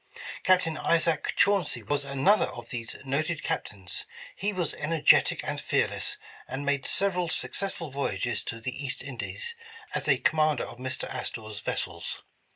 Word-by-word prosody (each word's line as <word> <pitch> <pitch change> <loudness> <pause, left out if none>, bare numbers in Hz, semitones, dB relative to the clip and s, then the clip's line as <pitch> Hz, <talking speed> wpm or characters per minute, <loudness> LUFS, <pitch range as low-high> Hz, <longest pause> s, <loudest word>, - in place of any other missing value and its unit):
Captain 180 -4 +3
Isaac 165 -1 +2
Chauncy 200 -6 +3
was 145 -1 0
another 140 +9 +3
of - - -9
these 120 -2 -4
noted 155 +3 0
Captains. 95 -3 -3 0.3
He 205 +2 -1
was 180 -5 -1
energetic 155 +1 +4
and - - -3
fearless, - - 0 0.3
and 135 +2 -4
made 140 -1 +1
several 180 -3 +2
successful 170 -2 -1
voyages 120 -4 -1
to 115 - -4
the 125 +4 -4
East 130 -2 -1
Indies 140 - -2 0.4
as - - -1
a - - +5
com 155 - +2
mander 155 -3 +3
of 120 - -8
Mr. 130 0 -3
Astor 110 -2 -4
's 105 - -5
vessels. - - -3
145 Hz, 155 wpm, -28 LUFS, 130-170 Hz, 0.4 s, a